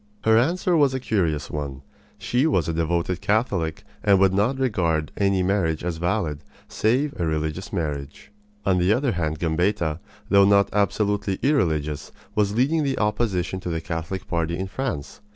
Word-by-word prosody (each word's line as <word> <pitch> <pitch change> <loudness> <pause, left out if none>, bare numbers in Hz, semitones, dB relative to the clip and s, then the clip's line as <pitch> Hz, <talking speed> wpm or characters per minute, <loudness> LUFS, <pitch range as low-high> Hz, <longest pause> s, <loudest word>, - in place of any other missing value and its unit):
Her 110 0 +4
answer 175 +9 +2
was 140 -4 +3
a - - -1
curious 85 - -1
one. 70 -2 -5 0.3
She 125 +5 +1
was 90 - +1
a 80 - -1
devoted 85 +2 -1
Catholic 100 -7 0 0.2
and 100 -2 +5
would 95 -1 +4
not 110 +7 +1
regard 85 - 0
any 100 -2 +2
marriage 90 -5 0
as 85 -2 -2
valid 85 -3 -1 0.3
save 130 +7 +1
a 85 - +1
religious 80 +3 -2
marriage. 75 -3 -4 0.3
On 95 -2 +3
the 90 +3 +3
other 130 +2 +1
hand, 80 -5 -2
Gambetta, 85 0 0 0.3
though 100 0 +6
not 100 0 +4
absolutely 105 -1 +1
irreligious, 80 - 0 0.2
was 105 -1 +1
leading 145 +7 +2
the 140 -2 -1
opposition 100 -4 0
to 90 - -5
the 80 -1 -1
Catholic 80 +3 -5
party 85 0 -1
in 95 - -2
France. 95 - -4
95 Hz, 165 wpm, -24 LUFS, 80-110 Hz, 0.3 s, though